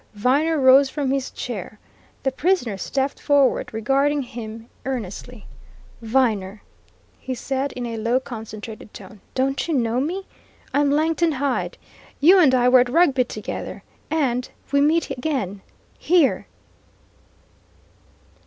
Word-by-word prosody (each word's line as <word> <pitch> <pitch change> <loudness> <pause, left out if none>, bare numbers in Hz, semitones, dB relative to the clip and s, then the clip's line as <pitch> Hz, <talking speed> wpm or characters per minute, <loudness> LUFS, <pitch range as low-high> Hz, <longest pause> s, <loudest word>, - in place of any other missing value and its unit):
Viner 285 +9 +2
rose 265 +1 +6
from 280 -2 -2
his 270 -1 -1
chair. 215 -3 -6 0.5
The 270 - +1
prisoner 265 - 0
stepped 270 +7 -2
forward, 285 -3 +2
regarding 275 +6 +1
him 225 -1 -8 0.2
earnestly. 245 -2 -6 0.6
"Viner!" 220 -4 0 0.6
he 260 - -4
said, 270 +2 -2
in 245 - -5
a 230 -1 -4
low, 230 +3 +1
concentrated 220 -3 -9
tone, 210 -4 -12
"don't 270 +3 0
you 325 - 0
know 235 -1 +1
me? 360 +8 -2 0.5
I'm 285 0 +3
Langton 320 +3 +2
Hyde! 275 -1 -2 0.4
You 360 +7 +7
and 275 -7 +5
I 245 -1 +3
were 255 0 +7
at 245 0 +2
Rugby 275 -4 +3
together. - - -6 0.3
And 255 -6 0 0.2
we 280 0 +3
meet 310 +1 +2
again, 250 - -3 0.4
here!" 335 -5 +2
260 Hz, 125 wpm, -22 LUFS, 235-285 Hz, 0.6 s, You